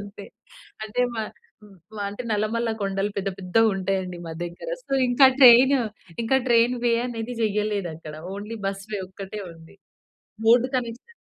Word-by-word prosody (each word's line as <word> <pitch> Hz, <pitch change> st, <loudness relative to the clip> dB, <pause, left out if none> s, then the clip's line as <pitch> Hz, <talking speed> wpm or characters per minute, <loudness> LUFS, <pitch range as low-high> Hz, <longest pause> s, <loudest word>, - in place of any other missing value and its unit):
అంతే. 200 Hz, 0 st, -10 dB, 0.6 s
అంటే 220 Hz, +3 st, -3 dB, 0.2 s
మా 220 Hz, -, -1 dB, 0.4 s
ఆహ్, 200 Hz, -2 st, -17 dB, 0.2 s
మా 205 Hz, -, -2 dB
అంటే 205 Hz, +5 st, -6 dB
నల్లమల్ల 220 Hz, +2 st, 0 dB
కొండలు 195 Hz, +1 st, -1 dB
పెద్ద 195 Hz, 0 st, -1 dB
పెద్దగా 195 Hz, +5 st, +2 dB
ఉంటాయండి 190 Hz, -2 st, -2 dB
మా 165 Hz, -, -5 dB
దెగ్గర. 175 Hz, -, -6 dB
సో, -, -, -8 dB, 0.2 s
ఇంకా 245 Hz, +2 st, +6 dB
ట్రైను 260 Hz, +2 st, +8 dB, 0.4 s
ఇంకా 230 Hz, +4 st, +2 dB
ట్రైన్‌ 240 Hz, +1 st, +4 dB
వే 235 Hz, -, +3 dB
అనేది 230 Hz, 0 st, -5 dB
జెయ్యలేదక్కడ. 200 Hz, -8 st, -2 dB, 0.2 s
ఓన్లీ 210 Hz, +3 st, -6 dB
బస్‌ 195 Hz, 0 st, -4 dB
వే 205 Hz, -, -1 dB
ఒక్కటే 195 Hz, +2 st, -8 dB
ఉంది. 165 Hz, +2 st, -16 dB, 0.7 s
Road 240 Hz, +2 st, +5 dB
connection 245 Hz, -, -5 dB
210 Hz, 150 wpm, -24 LUFS, 195-235 Hz, 0.7 s, ట్రైను